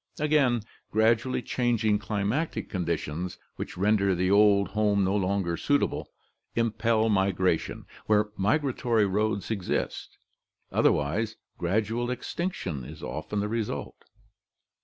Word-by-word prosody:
Again, 145 -6 +3 0.3
grad 110 +1 +4
ually 125 +1 -3
changing 115 -4 +1
climatic 110 +8 -2
conditions, 85 -1 -2 0.2
which - - -6
render 100 -1 +3
the 90 +2 +1
old 100 -1 +5
home 105 -1 +2
no 95 +1 +1
longer 95 -3 0
suitable, 145 0 0 0.5
impel 115 -1 +2
migration 95 -4 +1 0.2
where 105 0 +3
migratory 115 0 +1
roads 105 +1 0
exist, 100 -5 -3 0.5
otherwise 105 +10 +1 0.2
gradual 110 +6 0
extinction 125 - -3
is - - -10
often 105 -1 -3
the 105 - -1
result. 110 0 -4
105 Hz, 110 wpm, -27 LUFS, 95-115 Hz, 0.5 s, old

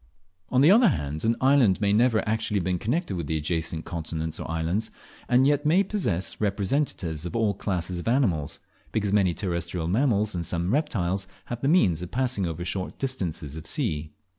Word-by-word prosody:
On 130 - +3
the 150 +6 +7
other 230 +3 +7
hand, 75 - -1
an 115 +1 +3
island 130 -8 +4
may 100 -1 +2
never 115 +1 +4
have - - 0
been 110 - +1
actually 100 -5 0
connected 120 - -1
with 85 -4 -4
the 80 - 0
adjacent 80 +1 -2
continents 80 -2 -4
or - - -6
islands, 80 +7 -1 0.4
and 125 +2 +5
yet 145 0 +3
may 170 +6 +4
possess 100 - -2
representatives 100 - -1
of 90 +6 -5
all 110 -3 +2
classes 90 -2 -3
of 85 - -7
animals, 105 - +1 0.3
because 105 -2 0
many 95 -5 +3
terrestrial 85 -2 -2
mammals 105 0 +2
and 85 -1 -2
some 85 +4 -1
reptiles 95 - 0 0.2
have 120 0 -5
the 135 - 0
means 95 - +3
of 90 - -6
passing 125 -6 0
over 85 +1 -4
short 90 +1 -3
distances 85 - -3
of 80 - -8
sea. 75 0 -2
95 Hz, 190 wpm, -26 LUFS, 85-125 Hz, 0.4 s, the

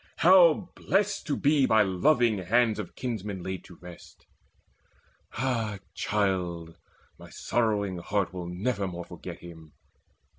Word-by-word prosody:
How 175 0 +5
blest 200 0 0
to 145 - -1
be 145 -2 +3
By 110 -1 +5
loving 110 +3 +2
hands 110 +4 +2
of 100 - -7
kinsmen 105 -6 -4
laid 95 0 -5
to 90 - -13
rest! 90 -1 -14 1.1
Ah 115 -5 -2 0.2
child, 90 -5 -2 0.4
my - - -12
sorrowing 105 -6 -1
heart 95 -1 -2
will 90 -2 -6
nevermore 95 -2 -3
Forget - - -9
him! 80 -3 -13
105 Hz, 120 wpm, -27 LUFS, 90-125 Hz, 1.1 s, How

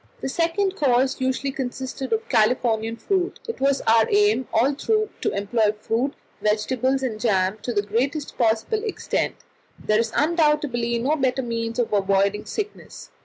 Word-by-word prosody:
The - - -3
second 345 +6 0
course 265 -1 +2
usually 260 +1 0
consisted 265 0 -5
of 450 0 0
Californian 225 -1 +1
fruit. 370 - -1
It 460 - -5
was 275 0 +2
our 225 0 +4
aim 415 - +3
all 250 +6 +3
through 430 +8 0
to - - +1
employ 210 +1 +1
fruit, 240 +6 -1 0.3
vegetables, 255 +5 0
and 225 -5 -2
jam, 195 -2 +1
to 245 - -3
the 205 -3 0
greatest 265 +8 -2
possible 230 - +1
extent; 435 - -2 0.4
there 215 0 +1
is 230 -1 0
undoubtedly 300 -7 +1
no 265 +7 +1
better 265 -2 0
means 230 -1 -3
of 240 -3 0
avoiding 200 +1 +1
sickness. 420 -1 -6
255 Hz, 155 wpm, -23 LUFS, 225-295 Hz, 0.4 s, our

